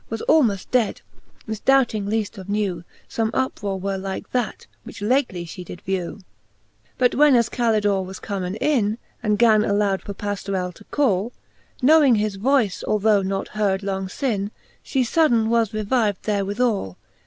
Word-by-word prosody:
Was 225 Hz, 0 st, -4 dB
almoft 235 Hz, -12 st, +2 dB
dead; 245 Hz, -5 st, +1 dB, 0.5 s
mifdoubting 220 Hz, -1 st, +2 dB
leaft 215 Hz, 0 st, -2 dB
of 190 Hz, +1 st, -10 dB
new 200 Hz, -5 st, -1 dB, 0.2 s
Some 225 Hz, -1 st, -1 dB
uprore 205 Hz, -7 st, -2 dB
were 195 Hz, +1 st, -2 dB
like 190 Hz, 0 st, -6 dB
that, 245 Hz, -5 st, -2 dB, 0.2 s
which -, -, -10 dB
lately 210 Hz, -5 st, 0 dB
fhe 180 Hz, +2 st, -8 dB
did 175 Hz, 0 st, -10 dB
vew. 185 Hz, -2 st, -2 dB
XLIV. 205 Hz, -, -16 dB, 0.8 s
But 250 Hz, -1 st, +3 dB
when 290 Hz, -1 st, +5 dB
as 235 Hz, -1 st, +3 dB
Calidore 210 Hz, -5 st, +1 dB
was 190 Hz, +1 st, -8 dB
comen 190 Hz, -2 st, -4 dB
in. 225 Hz, -8 st, +1 dB, 0.2 s
And 210 Hz, -2 st, +1 dB
gan 220 Hz, -2 st, +5 dB
aloud 200 Hz, -2 st, +1 dB
for 200 Hz, -, -7 dB
Pajiorell 195 Hz, -3 st, -3 dB
to 210 Hz, -, -16 dB
call. 235 Hz, -6 st, 0 dB, 0.5 s
Knowing 290 Hz, -3 st, +6 dB
his 210 Hz, -2 st, -1 dB
voice, 230 Hz, -3 st, +1 dB
although 210 Hz, -1 st, +3 dB
not 195 Hz, 0 st, -3 dB
heard 205 Hz, -2 st, 0 dB
long 190 Hz, -1 st, -3 dB
lin, 205 Hz, -6 st, 0 dB, 0.3 s
She 265 Hz, -2 st, 0 dB
fudden 240 Hz, -4 st, +2 dB
was 230 Hz, -2 st, +2 dB
revived 215 Hz, -1 st, 0 dB
therewithal! 205 Hz, -, -1 dB
210 Hz, 155 wpm, -22 LUFS, 195-235 Hz, 0.8 s, Knowing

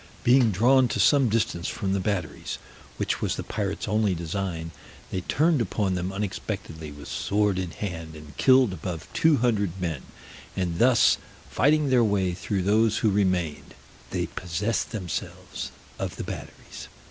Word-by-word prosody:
Being 125 Hz, -1 st, +5 dB
drawn 125 Hz, +6 st, +4 dB
to -, -, -2 dB
some 140 Hz, -5 st, +5 dB
distance 105 Hz, -6 st, 0 dB
from 95 Hz, -1 st, -2 dB
the 100 Hz, -, +1 dB
batteries, 90 Hz, -5 st, -3 dB, 0.4 s
which -, -, -1 dB
was -, -, 0 dB
the -, -, -4 dB
pirates -, -, -3 dB
only 105 Hz, -2 st, +2 dB
design, 85 Hz, -1 st, -3 dB, 0.4 s
they 95 Hz, -, -2 dB
turned 155 Hz, -, +2 dB
upon 100 Hz, -2 st, 0 dB
them 90 Hz, +1 st, -2 dB
unexpectedly 95 Hz, -5 st, -5 dB
with 75 Hz, 0 st, -10 dB
sword 105 Hz, -2 st, 0 dB
in 90 Hz, -2 st, -2 dB
hand, 85 Hz, -4 st, -6 dB
and 75 Hz, -2 st, -12 dB
killed 130 Hz, -6 st, +5 dB
above 90 Hz, -1 st, -5 dB
two 160 Hz, -2 st, +4 dB
hundred 105 Hz, -6 st, 0 dB
men; 80 Hz, -7 st, -2 dB, 0.6 s
and 85 Hz, -3 st, -1 dB
thus 125 Hz, 0 st, +5 dB, 0.3 s
fighting 145 Hz, 0 st, +3 dB
their 125 Hz, -2 st, +5 dB
way 100 Hz, -4 st, +1 dB
through 95 Hz, +1 st, -2 dB
those 110 Hz, +3 st, +3 dB
who 105 Hz, -, +4 dB
remained, 90 Hz, -6 st, 0 dB, 0.3 s
they 90 Hz, -2 st, -1 dB
possessed 90 Hz, +6 st, -2 dB
themselves 95 Hz, -8 st, -5 dB, 0.3 s
of -, -, -3 dB
the -, -, -5 dB
batteries. -, -, -8 dB
95 Hz, 155 wpm, -26 LUFS, 85-115 Hz, 0.6 s, Being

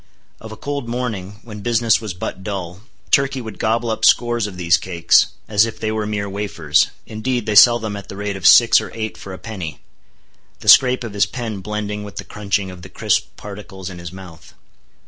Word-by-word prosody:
Of 110 Hz, -, -10 dB
a 110 Hz, -, -9 dB
cold 140 Hz, -4 st, -4 dB
morning 110 Hz, -5 st, -4 dB
when 105 Hz, -3 st, -9 dB
business 115 Hz, -1 st, +2 dB
was 105 Hz, -5 st, -5 dB
but 95 Hz, -1 st, -6 dB
dull, 95 Hz, -3 st, -5 dB, 0.3 s
Turkey 135 Hz, -1 st, +3 dB
would 110 Hz, -4 st, -8 dB
gobble 115 Hz, +1 st, 0 dB
up 110 Hz, -, -4 dB
scores 120 Hz, -2 st, +3 dB
of 95 Hz, -3 st, -9 dB
these 85 Hz, -1 st, +3 dB
cakes, 85 Hz, -1 st, +3 dB, 0.2 s
as 105 Hz, +1 st, +3 dB
if 115 Hz, -, -8 dB
they 110 Hz, -, -2 dB
were 110 Hz, -1 st, -2 dB
mere 100 Hz, -1 st, -2 dB
wafers—indeed 105 Hz, -, -1 dB
they 110 Hz, -, -1 dB
sell 120 Hz, +3 st, +8 dB
them 110 Hz, -3 st, -5 dB
at 100 Hz, -1 st, -9 dB
the -, -, -7 dB
rate 100 Hz, 0 st, -3 dB
of 95 Hz, -2 st, +1 dB
six 120 Hz, -1 st, +7 dB
or -, -, -8 dB
eight 110 Hz, -1 st, -4 dB
for 100 Hz, -, -10 dB
a 95 Hz, -, -7 dB
penny—the 90 Hz, -10 st, -11 dB
scrape 130 Hz, -1 st, +6 dB
of 115 Hz, -3 st, -6 dB
his 100 Hz, -, +2 dB
pen 115 Hz, -5 st, -5 dB
blending 105 Hz, +1 st, -4 dB
with 100 Hz, -3 st, -10 dB
the -, -, -5 dB
crunching 100 Hz, -2 st, -2 dB
of 90 Hz, -1 st, -11 dB
the 95 Hz, -, -11 dB
crisp -, -, -1 dB
particles 100 Hz, -2 st, -9 dB
in 90 Hz, -, -9 dB
his 85 Hz, -1 st, -8 dB
mouth. 90 Hz, -3 st, -13 dB
105 Hz, 205 wpm, -19 LUFS, 95-115 Hz, 0.3 s, sell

